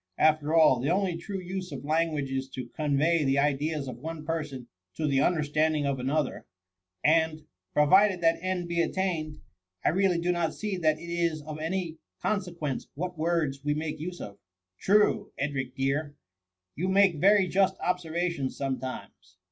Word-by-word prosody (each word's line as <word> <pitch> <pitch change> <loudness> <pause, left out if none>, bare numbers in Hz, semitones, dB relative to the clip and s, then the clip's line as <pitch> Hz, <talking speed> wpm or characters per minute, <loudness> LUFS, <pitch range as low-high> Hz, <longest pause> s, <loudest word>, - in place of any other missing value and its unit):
Af 155 0 +4
ter 150 +2 -1
all, 155 -6 +6
the 135 +4 -1
only 185 0 +1
true 190 +4 -5
use 185 -1 -5
of 140 -1 -7
language 155 -3 0
is 135 0 -2
to 130 -2 -7
con* 150 -2 -1
vey 165 +2 +3
the 135 0 +2
ideas 145 +1 0
of 125 -3 -6
one 160 +2 -6
person 150 -6 -4 0.3
to 160 - -2
the 140 -2 +2
understand 155 -1 +2
ing 145 -1 0
of 140 -2 -1
another; 145 +4 -1 0.6
and, 160 0 +2 0.3
provided 185 +6 +5
that 165 -1 +2
end 185 -1 -2
be 170 0 +1
at - - -1
tained, 165 -5 -2 0.5
I - - +5
really 185 +1 +2
do 175 +1 +1
not 170 -2 -1
see 210 -2 -3
that 155 -3 +2
it - - -12
is 170 -3 0
of 155 0 -7
any 165 0 -3 0.2
con 210 -2 0
sequence 170 -7 -5
what 180 +4 -4
words 160 -4 0
we 150 0 0
make 155 0 -3
use 175 +3 -5
of." 100 -1 -8 0.4
True, 210 +1 +2
Edric 135 -2 -3
dear! 145 +2 -1 0.6
you 180 +5 -2
make 190 -3 +4
very 195 +2 +5
just 190 +1 +2
observations 170 -5 -2
sometimes. 130 -8 -5
155 Hz, 180 wpm, -28 LUFS, 145-175 Hz, 0.6 s, all